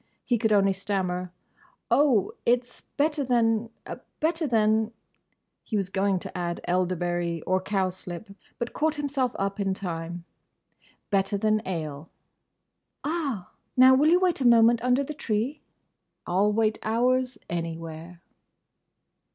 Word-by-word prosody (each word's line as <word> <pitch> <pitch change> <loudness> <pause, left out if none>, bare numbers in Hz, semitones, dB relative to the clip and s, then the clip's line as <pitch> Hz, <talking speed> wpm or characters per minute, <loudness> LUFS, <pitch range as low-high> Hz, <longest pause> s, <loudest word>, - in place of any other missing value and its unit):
He 240 -3 +1
could 220 0 +1
only 195 -2 +4
stammer, 185 -2 -2 0.6
"Oh, 270 -9 +4
it's 245 +1 0 0.2
better 295 0 +1
than—better 240 +7 -1
than—" 220 -1 +2 0.7
he 215 - -3
was 195 -2 -1
going 195 0 +1
to - - -7
add 175 -1 -2
elderberry, 175 -2 -1
or 185 0 +1
cowslip, 185 0 -3 0.3
but 235 -1 -4
caught 315 0 +1
himself 280 -4 -1
up 195 +1 -2
in 195 -1 0
time—"better 175 +3 -5
than 215 +1 +2
ale." 155 -4 -4 0.9
"Ah!—Now, 260 - +2
will 290 +4 +4
you 350 +2 +5
wait 360 -5 +1
a 250 - +4
moment 230 0 +6
under 250 +2 +3
the 300 - -5
tree?" 250 +1 -2 0.6
"I'll 195 +4 +2
wait 215 0 +1
hours, 250 +3 +1
anywhere!" 165 0 -6
215 Hz, 120 wpm, -26 LUFS, 180-250 Hz, 0.9 s, moment